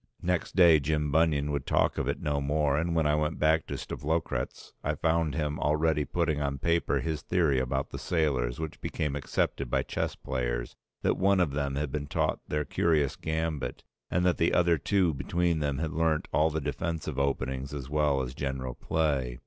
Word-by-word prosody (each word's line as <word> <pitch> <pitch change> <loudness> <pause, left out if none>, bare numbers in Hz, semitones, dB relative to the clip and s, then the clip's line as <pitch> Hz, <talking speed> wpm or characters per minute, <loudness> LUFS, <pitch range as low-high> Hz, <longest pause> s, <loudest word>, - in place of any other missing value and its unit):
Next 90 -2 -1
day 85 -4 +7
Jim 75 +1 0
Bunion 75 -2 +2
would 70 -2 -3
talk - - +2
of - - -1
it - - -1
no 75 -1 -1
more; 75 0 +1
and 85 +3 0
when 80 -1 +2
I 75 - +3
went 75 +1 0
back 80 +1 +2
to - - -4
Stavlokratz 80 +3 -3
I - - 0
found 80 -3 +1
him 75 -2 -1
already 75 0 +2
putting 80 -1 0
on 70 -1 -1
paper 85 +4 +1
his 80 -2 -2
theory 80 -7 +2
about 65 +1 -2
the - - -5
sailors, 70 -7 0
which 80 -1 -5
became 75 -2 -2
accepted 70 -2 -1
by - - +1
chess - - -2
players, - - -3 0.3
that - - +2
one 95 0 +4
of 85 -6 +2
them 70 -1 -2
had 70 -1 -2
been 70 0 -3
taught - - 0
their 75 0 -1
curious 75 -4 +1
gambit 80 -3 -3 0.3
and 90 +1 +1
that 90 -2 +3
the 85 - +2
other 85 -2 +3
two 90 +1 +2
between 85 +4 0
them 70 -2 -1
had 80 0 -2
learnt 80 -1 +1
all 80 +1 +4
the 80 0 -2
defensive 80 -2 -3
openings 65 -1 -1
as 70 -3 -5
well 75 -2 +1
as 60 0 -5
general 65 -2 -3
play. 70 -7 -1
75 Hz, 195 wpm, -29 LUFS, 70-80 Hz, 0.3 s, day